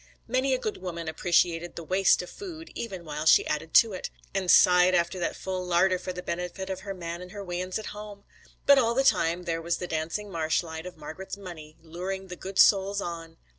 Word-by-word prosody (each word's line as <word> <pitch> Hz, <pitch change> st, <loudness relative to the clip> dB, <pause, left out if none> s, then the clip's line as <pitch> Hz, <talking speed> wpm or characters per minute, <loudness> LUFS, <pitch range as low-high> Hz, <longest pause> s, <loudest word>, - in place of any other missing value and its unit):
Many 260 Hz, +2 st, +1 dB
a -, -, -3 dB
good 215 Hz, -4 st, -3 dB
woman 170 Hz, -3 st, -6 dB
appreciated 170 Hz, +1 st, +1 dB
the 170 Hz, -, -6 dB
waste 185 Hz, +2 st, +3 dB
of 180 Hz, -, -10 dB
good -, -, -14 dB
food 340 Hz, -5 st, -8 dB
even 190 Hz, -7 st, -6 dB
while 150 Hz, +1 st, -4 dB
she -, -, +7 dB
added 150 Hz, +2 st, -3 dB
to 225 Hz, -3 st, +7 dB
it, 185 Hz, -, -5 dB, 0.2 s
and 190 Hz, -2 st, -1 dB
sighed 180 Hz, +1 st, +6 dB
after 170 Hz, +1 st, +1 dB
that 175 Hz, -, -1 dB
full 185 Hz, -1 st, -4 dB
larder 180 Hz, +1 st, +2 dB
for 185 Hz, -, -5 dB
the 180 Hz, 0 st, -7 dB
benefit 180 Hz, +2 st, -4 dB
of 190 Hz, -, -4 dB
her 195 Hz, 0 st, -6 dB
man 170 Hz, -1 st, -6 dB
and 180 Hz, -, -9 dB
the 200 Hz, +1 st, -7 dB
weans 180 Hz, 0 st, -3 dB
at 220 Hz, -, -6 dB
home; 205 Hz, -1 st, -9 dB, 0.4 s
but 280 Hz, -1 st, +7 dB
all 235 Hz, -2 st, +2 dB
the 270 Hz, -, +3 dB
time 175 Hz, -8 st, +2 dB
there 165 Hz, -1 st, -2 dB
was 170 Hz, +1 st, -1 dB
the 180 Hz, -, -4 dB
dancing 170 Hz, +6 st, -3 dB
marsh 160 Hz, -1 st, 0 dB
light 160 Hz, +1 st, -7 dB
of 180 Hz, -, -10 dB
Margret's 190 Hz, +1 st, -7 dB
money 165 Hz, -6 st, -10 dB
luring 185 Hz, +4 st, -5 dB
the 180 Hz, -, -6 dB
good 190 Hz, +2 st, -8 dB
souls 200 Hz, 0 st, +5 dB
on. 165 Hz, -3 st, -6 dB
180 Hz, 225 wpm, -27 LUFS, 170-195 Hz, 0.4 s, she